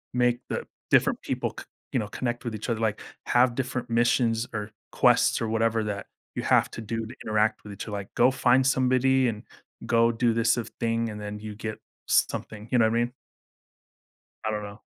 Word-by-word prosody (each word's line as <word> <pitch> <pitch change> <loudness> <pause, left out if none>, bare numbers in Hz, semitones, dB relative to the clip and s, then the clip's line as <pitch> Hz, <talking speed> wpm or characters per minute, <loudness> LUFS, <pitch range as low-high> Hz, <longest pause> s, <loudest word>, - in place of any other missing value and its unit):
make 125 0 +3
the - - -3 0.3
different - - +4
people - - -2
c - - -9 0.3
you - - +2
know, 105 - -3
connect 120 +2 -3
with 115 -2 -3
each 110 - -5
other, 115 - 0
like, 110 -2 0 0.3
have 125 0 +4
different 130 -1 -2
missions, 115 0 +2
or 105 0 -4 0.2
quests, - - +4
or 115 - 0
whatever 115 0 +1
that 100 -2 -4 0.3
you - - -1
have - - +3
to - - -7
do 115 +1 -3
to 125 - -9
interact 110 0 +1
with 105 - -9
each 100 - -6
other, 110 - -7
like, 100 -1 -6
go 125 +2 +5
find 130 0 +3
somebody 130 0 +3
and 105 -3 -3 0.4
go 115 0 +4
do 115 0 +1
this 115 0 +2
of 120 - -3
thing 115 0 0
and 105 -1 -7
then 105 0 -5
you 105 0 -7
get 110 0 -5 0.3
something, 105 0 0
you 125 - +4
know 110 - +5
what 110 - +2
I 120 - +3
mean? 120 - -4 1.3
I 110 - 0
don't 105 -1 -2
know. 100 +1 -9
115 Hz, 210 wpm, -27 LUFS, 110-120 Hz, 1.3 s, go